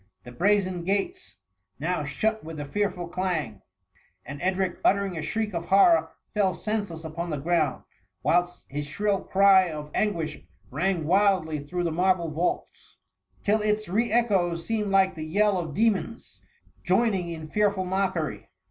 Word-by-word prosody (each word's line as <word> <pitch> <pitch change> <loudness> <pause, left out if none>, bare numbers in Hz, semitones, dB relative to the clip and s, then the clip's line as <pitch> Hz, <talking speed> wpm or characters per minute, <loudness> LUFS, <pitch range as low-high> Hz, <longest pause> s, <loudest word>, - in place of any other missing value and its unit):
The 125 - -10
brazen 185 +3 +1
gates 200 - -2 0.4
now 165 +2 -1
shut 220 +10 -1
with 160 -1 -7
a 145 - -4
fearful 190 +2 -2
clang, 170 - -2 0.6
and 140 +2 -8
Edric, 185 0 0
uttering 200 -2 +2
a 160 - -3
shriek 210 +7 -2
of 170 -1 -3
horror, 265 - +5 0.2
fell 195 -4 +1
senseless 205 -7 -3
upon 165 +2 -5
the 150 - -2
ground, 160 +2 0 0.4
whilst 175 +1 +1
his 145 +1 -4
shrill 200 +5 0
cry 190 -2 +5
of 150 -1 -7
an 210 -1 +1
guish 160 -2 -5 0.3
rang 170 +3 0
wildly 185 -4 +2
through 175 +4 -3
the 170 - 0
marble 175 -1 +1
vaults, 165 +4 -3 0.5
THE 205 - +1
MUMMY. 215 - +4
S21 - - -4
till 215 - +1
its 215 -3 -10
re 225 +5 +1
echoes 190 -8 +1
seemed 215 -2 -1
like 195 -1 +3
the 155 - -6
yell 200 +4 +2
of 160 -4 -5
demons 225 +1 -1 0.4
joining 190 -2 +1
in 160 -2 -6
fearful 205 +1 +1
mockery. 180 - -2
185 Hz, 165 wpm, -26 LUFS, 160-205 Hz, 0.6 s, horror